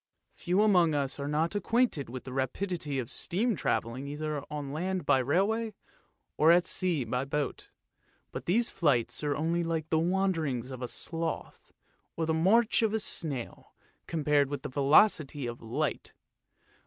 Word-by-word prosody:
Few 180 Hz, +2 st, -1 dB
amongst 175 Hz, -7 st, +4 dB
us 140 Hz, -1 st, -1 dB
are 140 Hz, -, -3 dB
not 155 Hz, +4 st, 0 dB
acquainted 205 Hz, -, 0 dB
with 125 Hz, +1 st, -7 dB
the 130 Hz, -, -8 dB
rapidity 145 Hz, +3 st, -2 dB
of 125 Hz, -3 st, -4 dB
steam 220 Hz, +6 st, 0 dB
travelling 130 Hz, -3 st, -2 dB
either 150 Hz, 0 st, -4 dB
on 145 Hz, -2 st, -5 dB
land 185 Hz, +4 st, -2 dB
by 130 Hz, -, +4 dB
railway, 200 Hz, -, 0 dB, 0.6 s
or 160 Hz, +2 st, +6 dB
at 175 Hz, +1 st, +5 dB
sea 175 Hz, -7 st, -1 dB
by 125 Hz, +3 st, -2 dB
boat, 140 Hz, 0 st, -3 dB, 0.6 s
but -, -, -6 dB
these 225 Hz, +7 st, +2 dB
flights 120 Hz, -6 st, +1 dB
are 145 Hz, -1 st, 0 dB
only 165 Hz, +3 st, 0 dB
like 165 Hz, -1 st, -3 dB
the 160 Hz, -, +3 dB
wanderings 165 Hz, -8 st, 0 dB
of 130 Hz, -, -7 dB
the 125 Hz, -, -4 dB
sloth, 165 Hz, +5 st, -5 dB, 0.5 s
or 165 Hz, -, 0 dB
the 160 Hz, -, 0 dB
march 215 Hz, +10 st, +3 dB
of 220 Hz, -2 st, +2 dB
the 220 Hz, -, +1 dB
snail, 145 Hz, -, -2 dB, 0.3 s
compared 145 Hz, -3 st, +2 dB
with 145 Hz, -2 st, -5 dB
the -, -, -4 dB
velocity 145 Hz, +1 st, +3 dB
of 120 Hz, 0 st, -6 dB
light. 115 Hz, 0 st, -3 dB
155 Hz, 160 wpm, -29 LUFS, 135-180 Hz, 0.6 s, or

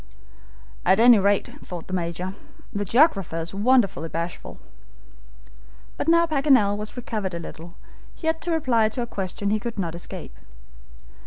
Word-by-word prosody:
"At 190 Hz, +3 st, +4 dB
any 235 Hz, -1 st, +8 dB
rate," 200 Hz, +1 st, +2 dB, 0.2 s
thought 175 Hz, -2 st, -7 dB
the 185 Hz, -, -8 dB
Major, 180 Hz, +1 st, -3 dB, 0.4 s
"the 205 Hz, 0 st, -2 dB
geographer 200 Hz, -, +3 dB
is 165 Hz, +2 st, -6 dB
wonderfully 205 Hz, -6 st, +2 dB
bashful." 170 Hz, +2 st, -5 dB, 1.4 s
But -, -, -4 dB
now 335 Hz, +1 st, +5 dB
Paganel 275 Hz, -10 st, +3 dB
was 210 Hz, +4 st, -6 dB
recovered 210 Hz, -7 st, -3 dB
a -, -, -4 dB
little, 170 Hz, +1 st, -10 dB, 0.4 s
he -, -, -10 dB
had 320 Hz, 0 st, 0 dB
to 350 Hz, -, -2 dB
reply 245 Hz, -9 st, +2 dB
to 240 Hz, +3 st, -3 dB
a -, -, -3 dB
question 200 Hz, -1 st, -3 dB
he 215 Hz, -, +1 dB
could 230 Hz, +1 st, -5 dB
not 170 Hz, -4 st, -2 dB
escape. 170 Hz, -, -8 dB
205 Hz, 155 wpm, -24 LUFS, 180-245 Hz, 1.4 s, any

